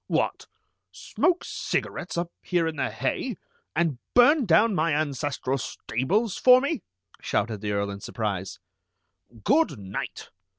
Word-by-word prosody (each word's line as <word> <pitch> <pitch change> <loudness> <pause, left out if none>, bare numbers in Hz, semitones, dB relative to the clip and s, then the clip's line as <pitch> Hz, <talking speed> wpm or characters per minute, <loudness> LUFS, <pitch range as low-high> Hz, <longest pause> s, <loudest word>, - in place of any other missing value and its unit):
"What! - - -1 0.4
Smoke 355 -1 0
cigarettes 175 - -3
up 170 0 -2
here 175 -2 +1
in 160 -1 -2
the 140 - -1
hay, 135 - -2 0.4
and 155 -6 +1 0.2
burn 255 +1 +6
down 205 +7 +5
my 165 -3 +1
ancestral 140 -2 -1
stables 175 - -1
for 250 0 +7
me!" 280 - -1 0.4
shouted 105 -1 -1
the 105 -1 -2
Earl 100 0 -1
in 100 - -7
surprise. 100 -3 -3 0.9
"Good 295 - +3
night! 95 -2 -6
155 Hz, 130 wpm, -26 LUFS, -, 0.9 s, for